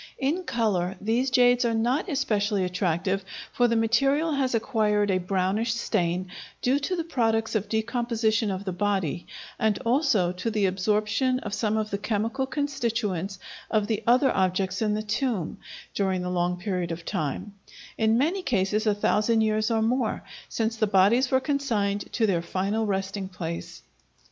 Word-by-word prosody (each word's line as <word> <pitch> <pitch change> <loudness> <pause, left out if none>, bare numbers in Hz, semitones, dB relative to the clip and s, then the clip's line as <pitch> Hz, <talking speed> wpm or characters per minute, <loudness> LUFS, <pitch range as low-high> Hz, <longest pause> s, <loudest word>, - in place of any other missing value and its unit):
In 315 +7 -1
color 190 - 0
these 230 +6 +1
jades 245 0 +4
are 230 -1 +1
not 250 - 0
especially 210 - 0
attractive, 180 +1 -1 0.3
for 245 - +3
the 230 - +1
material 275 +8 +2
has 270 -4 0
acquired 210 -3 +1
a 185 - +2
brownish 195 +5 0
stain, 180 -4 -1 0.3
due 265 +3 +2
to 295 +6 -2
the 335 - -2
products 225 -8 0
of 215 -2 -1
decomposition 225 -1 0
of 195 +1 -4
the 190 - -2
body, 190 -4 -1 0.3
and 220 -2 +2
also 230 - +2
to 185 +5 -3
the 210 -2 +1
absorption 210 +7 +1
of 210 - -5
some 215 0 0
of 215 -1 -2
the 200 - -2
chemical 225 +5 -1
constituents 230 - -2 0.3
of 215 -2 +1
the 220 0 -1
other 255 +2 +4
objects 190 +1 0
in 210 -1 +1
the 215 - -2
tomb, 215 - -2 0.3
during 190 -2 0
the 180 - -3
long 180 0 0
period 180 -2 -2
of 165 0 -6
time, 155 +7 -3 0.4
in 220 0 +2
many 330 +9 +1
cases 215 - 0
a 210 - +3
thousand 215 +2 +2
years 215 0 +1
or 225 -1 +1
more, 240 0 0 0.3
since 225 0 -1
the 215 -1 +2
bodies 205 +6 +4
were 260 - +3
consigned 230 -8 -1
to 230 - +1
their 180 -5 +1
final 200 +5 -1
resting 195 0 -2
place. 170 -3 -6
215 Hz, 165 wpm, -26 LUFS, 195-240 Hz, 0.4 s, jades